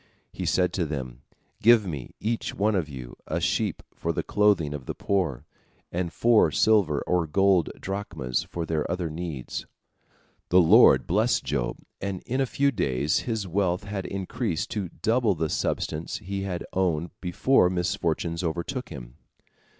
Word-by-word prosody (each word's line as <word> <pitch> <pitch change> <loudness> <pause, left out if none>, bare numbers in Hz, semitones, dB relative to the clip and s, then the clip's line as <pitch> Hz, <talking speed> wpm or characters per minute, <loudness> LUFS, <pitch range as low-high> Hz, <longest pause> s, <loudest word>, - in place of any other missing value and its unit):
He - - -4
said 90 -1 +2
to 90 - 0
them, 65 -4 -5 0.4
"Give 115 -1 +6
me, 75 -9 -6
each 115 +2 -2
one 105 +2 +2
of 90 -6 0
you, 65 -4 -8
a - - -1
sheep - - -1
for - - -2
the - - -2
clothing 100 -8 +2
of 70 -4 -7
the - - -4
poor, 85 -9 -1 0.5
and 85 -1 -2
four 115 +2 +4
silver 100 -10 +3
or 90 -2 +1
gold 95 +1 +3
drachmas 95 -11 -3
for 85 -1 -3
their 80 -2 -1
other 85 -2 -2
needs." 80 -6 -5 0.8
The 90 - +6
Lord 95 +8 +7
blessed 110 +8 +2
Job, - - -2 0.2
and 95 -2 -4
in 130 +3 -1
a 135 - +1
few 140 +3 +2
days 75 - 0
his 110 -4 -2
wealth 90 0 0
had 100 -1 -4
increased 100 -1 -3
to 105 -6 -3
double 110 +2 +1
the 80 -1 -1
substance 75 +2 -2
he 100 -1 -5
had 90 -3 -3
owned 85 -3 0
before 90 +3 +3
misfortune 85 -2 -1
overtook 85 - -3
him. 65 -3 -10
90 Hz, 160 wpm, -26 LUFS, 80-100 Hz, 0.8 s, Lord